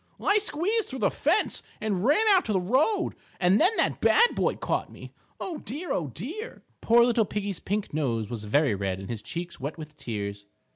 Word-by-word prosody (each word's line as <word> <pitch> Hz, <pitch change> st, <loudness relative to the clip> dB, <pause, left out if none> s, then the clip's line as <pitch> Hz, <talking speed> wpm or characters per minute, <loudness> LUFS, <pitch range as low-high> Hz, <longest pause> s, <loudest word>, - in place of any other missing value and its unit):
"I 410 Hz, +1 st, +3 dB
squeezed 415 Hz, +3 st, 0 dB
through 265 Hz, -, -5 dB
the -, -, +3 dB
fence -, -, +1 dB, 0.2 s
and 200 Hz, -4 st, -1 dB
ran 305 Hz, -, +4 dB
out 380 Hz, -3 st, +5 dB
to 215 Hz, -, -1 dB
the 190 Hz, -, +3 dB
road, 260 Hz, -, +1 dB, 0.3 s
and 185 Hz, +2 st, +4 dB
then 355 Hz, -, +6 dB
that -, -, +1 dB
bad 475 Hz, +2 st, +5 dB
boy -, -, +1 dB
caught -, -, -2 dB
me. -, -, -11 dB, 0.3 s
Oh, 335 Hz, -5 st, -4 dB
dear, 305 Hz, +10 st, -5 dB
oh, 160 Hz, -, 0 dB
dear!" 320 Hz, -, -7 dB, 0.2 s
Poor 235 Hz, +1 st, +5 dB
little 235 Hz, -2 st, +3 dB
Piggie's 205 Hz, -2 st, -3 dB
pink 205 Hz, -3 st, -3 dB
nose 120 Hz, -8 st, -1 dB
was 110 Hz, -1 st, -5 dB
very 140 Hz, +3 st, +2 dB
red 95 Hz, -1 st, -2 dB
and 95 Hz, +4 st, -7 dB
his 110 Hz, -2 st, -4 dB
cheeks 170 Hz, +10 st, -6 dB
wet 145 Hz, +5 st, -5 dB
with 155 Hz, -2 st, -9 dB
tears. 100 Hz, -2 st, -5 dB
195 Hz, 200 wpm, -27 LUFS, -, 0.3 s, then